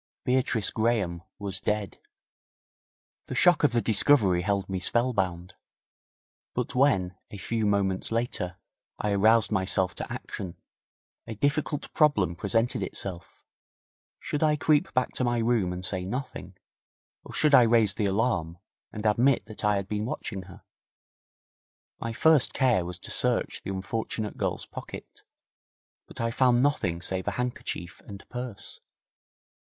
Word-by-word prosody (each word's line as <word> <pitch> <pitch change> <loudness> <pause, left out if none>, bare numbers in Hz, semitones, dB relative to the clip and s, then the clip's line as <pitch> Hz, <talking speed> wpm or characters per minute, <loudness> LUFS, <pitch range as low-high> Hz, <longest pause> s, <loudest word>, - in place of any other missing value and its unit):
Beatrice 125 -4 +1
Graham 110 -7 0 0.2
was 100 -2 -3
dead. 105 -3 -2 1.3
The - - -5
shock 175 -4 +4
of 150 - +5
the 120 -1 +1
discovery 105 -5 +3
held 100 +1 -1
me 95 -1 -3
spellbound. 95 -5 0 1.0
But - - -2
when, 110 -10 +2
a 100 - -8
few 110 +2 -1
moments 100 -1 0
later, 115 -6 -2 0.4
I 105 - -1
aroused 110 +3 +4
myself 95 -2 +1
to - - -6
action, 90 -4 -6 0.7
a 110 - -5
difficult 145 +4 -1
problem 105 - +3
presented 115 +7 0
itself. 90 -3 -5 0.8
Should 150 - -3
I 155 -1 +4
creep 150 +1 +2
back 130 0 +1
to - - 0
my 120 -1 +1
room 115 -5 +1
and 90 0 -3
say 95 -1 0
nothing, 125 +8 -5 0.7
or - - -11
should 150 -2 +2
I 130 - +9
raise 115 -4 +4
the 105 -1 0
alarm, 95 -5 0 0.3
and 105 0 -7
admit 120 +5 +3
that 110 0 -8
I 105 0 +3
had 100 -1 -2
been 105 +1 -2
watching 100 -5 -4
her? 95 +1 -14 1.4
My 115 - -3
first 155 +4 +4
care 125 -10 +2
was 90 0 -6
to - - -9
search - - +1
the - - -7
unfortunate 105 +2 -3
girl's - - -2
pocket, - - -10 0.9
but - - -10
I 115 0 0
found 125 0 +3
nothing 95 - 0
save 95 0 -1
a - - +1
handkerchief 120 -7 -4
and 100 -1 -10
purse. 125 -4 -7
105 Hz, 145 wpm, -27 LUFS, 95-125 Hz, 1.4 s, I